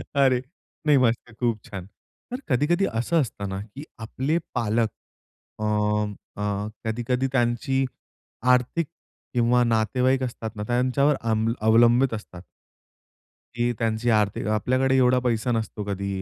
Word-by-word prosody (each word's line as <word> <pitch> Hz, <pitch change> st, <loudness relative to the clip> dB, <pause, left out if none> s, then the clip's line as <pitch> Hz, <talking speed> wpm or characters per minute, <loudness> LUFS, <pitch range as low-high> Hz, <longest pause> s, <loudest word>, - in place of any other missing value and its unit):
अरे! 130 Hz, -3 st, +4 dB, 0.4 s
नाही, 150 Hz, -2 st, +5 dB
मस्त 120 Hz, -2 st, +1 dB
खूप 115 Hz, -4 st, 0 dB
छान! 100 Hz, -6 st, -7 dB, 0.5 s
तर 250 Hz, -, -3 dB
कधी-कधी 150 Hz, +8 st, +2 dB
असं 125 Hz, +9 st, +2 dB
असतं 100 Hz, -6 st, -4 dB
ना, 95 Hz, -, -4 dB
की 110 Hz, +7 st, -10 dB, 0.2 s
आपले 130 Hz, +8 st, -1 dB, 0.2 s
पालक, 115 Hz, -1 st, +1 dB, 0.7 s
अ, -, -, -3 dB, 0.8 s
अ, 105 Hz, 0 st, -1 dB, 0.2 s
कधी-कधी 120 Hz, +3 st, 0 dB
त्यांची 130 Hz, +1 st, +1 dB, 0.7 s
आर्थिक 125 Hz, +6 st, +1 dB, 0.5 s
किंवा 120 Hz, 0 st, +3 dB
नातेवाईक 125 Hz, +3 st, +2 dB
असतात 115 Hz, -3 st, -5 dB
ना, 105 Hz, -, -4 dB
त्यांच्यावर 130 Hz, +4 st, +2 dB
अं 110 Hz, -1 st, 0 dB, 0.2 s
अवलंबित 120 Hz, +3 st, +5 dB
असतात. 95 Hz, -5 st, -8 dB, 1.1 s
की 120 Hz, 0 st, +1 dB
त्यांची 115 Hz, +1 st, 0 dB
आर्थिक 105 Hz, -3 st, +1 dB
आपल्याकडे 130 Hz, +5 st, +2 dB
एवढा 125 Hz, 0 st, +4 dB
पैसा 120 Hz, 0 st, 0 dB
नसतो 110 Hz, -2 st, -2 dB
कधी 100 Hz, -1 st, -3 dB
120 Hz, 125 wpm, -25 LUFS, 110-130 Hz, 1.1 s, नाही